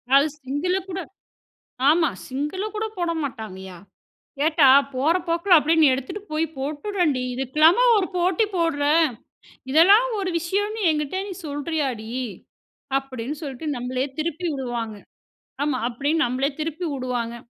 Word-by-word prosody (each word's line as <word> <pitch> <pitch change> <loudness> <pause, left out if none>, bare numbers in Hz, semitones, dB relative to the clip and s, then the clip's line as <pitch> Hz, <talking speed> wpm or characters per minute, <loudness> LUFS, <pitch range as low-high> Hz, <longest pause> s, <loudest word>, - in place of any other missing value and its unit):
அது 280 +2 +6 0.2
சிங்குல 290 +8 -1
கூட 380 +1 -4 0.9
ஆமா. 320 -1 +4 0.2
சிங்குல 295 +9 -3
கூட 435 +1 -1
போட 345 -1 0
மாட்டாங்கய்யா. 190 -8 -7 0.6
கேட்டா, 305 -2 +5 0.3
"போற 290 +7 +2
போக்குல 340 +2 +4
அப்படியே 320 +2 +2
நீ 310 - +7
எடுத்துட்டு 270 +10 -6
போய் 310 +1 +1
போட்டுடேன்டி, 300 0 -1
இதுக்கெல்லாமா 305 - +4 0.2
ஒரு 375 - 0
போட்டி 360 +4 +2
போட்ற. 330 -5 0 0.9
இதெல்லாம் 390 - +6
ஒரு 380 -2 -1
விஷயம்னு 410 +6 -2
என்கிட்ட 300 +3 -1
நீ 390 - -5
சொல்றியாடி?" 285 -6 -3 0.9
அப்படின்னு 270 0 -5
சொல்லிட்டு 285 0 -6
நம்மளயே 255 +2 -2
திருப்பி 335 +2 -2
விடுவாங்க. 240 -5 -4 0.7
ஆமா. 290 -3 0
அப்படின்னு 285 +7 0
நம்மளயே 260 +4 0
திருப்பி 325 +3 -3
வுடுவாங்க. 250 -3 -3
300 Hz, 125 wpm, -23 LUFS, 260-340 Hz, 0.9 s, நீ